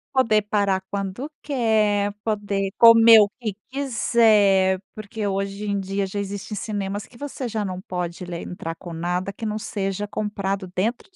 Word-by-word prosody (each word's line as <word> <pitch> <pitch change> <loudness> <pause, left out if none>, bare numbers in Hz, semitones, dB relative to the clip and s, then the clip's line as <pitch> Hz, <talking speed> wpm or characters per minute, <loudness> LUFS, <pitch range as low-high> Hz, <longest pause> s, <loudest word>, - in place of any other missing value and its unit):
Poder 220 -5 +4
parar 200 -2 0
quando 200 +8 -4
quer, 215 -6 +1
poder 205 -3 -1
comer 230 -1 +9
o 205 - +3
que 215 -5 -3 0.2
quiser, 215 -8 +3
porque 215 0 -5
hoje 195 +1 -3
em 200 0 0
dia, 195 +1 -2
já 205 +2 -4
existem 200 +1 -5
cinemas, 205 -1 -3
que 245 - -21
você 275 -1 -5
já 220 -2 -2
não 185 -2 -4
pode 180 -1 -5
le 175 -1 -5
entrar 165 -2 -6
com 175 0 -10
nada, 180 +4 -2
que 225 - -7
não 215 0 -2
seja 200 -1 -3
comprado 200 -2 -3
dentro 225 +6 -1
do 370 - -32
205 Hz, 165 wpm, -23 LUFS, 195-220 Hz, 0.2 s, comer